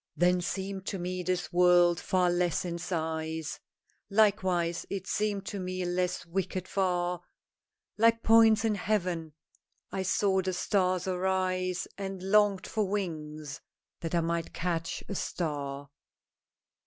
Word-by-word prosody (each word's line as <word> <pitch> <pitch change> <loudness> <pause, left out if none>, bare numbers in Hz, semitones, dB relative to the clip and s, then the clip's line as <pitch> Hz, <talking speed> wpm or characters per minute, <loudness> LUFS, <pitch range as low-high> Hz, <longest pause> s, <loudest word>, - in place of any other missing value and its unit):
"Then 180 +1 +3
seemed 190 +2 -4
to 195 - -2
me 180 +1 -3
this 180 0 -2
world 175 -1 +5
far 180 -1 +2
less 175 0 +1
in 170 -1 -3
size, 160 -2 -3 0.5
Likewise 185 -5 +2
it 195 -1 -4
seemed 205 -1 -1
to 200 - -4
me 185 0 -3
less 180 0 -1
wicked 185 +1 -3
far; 180 -2 0 0.8
Like 230 +1 +4
points 225 -1 +6
in 220 - +2
heaven 180 -6 -1 0.6
I 190 - -2
saw 190 0 +2
the 185 0 -2
stars 185 -1 +1
arise, 185 -1 0
And 195 -1 -5
longed 200 -1 +3
for 215 -3 -1
wings 155 -7 -4 0.4
that 165 +1 -3
I 170 - +3
might 165 0 -2
catch 170 -2 -2
a - - -4
star." 145 -6 -3
180 Hz, 130 wpm, -29 LUFS, 170-195 Hz, 0.8 s, points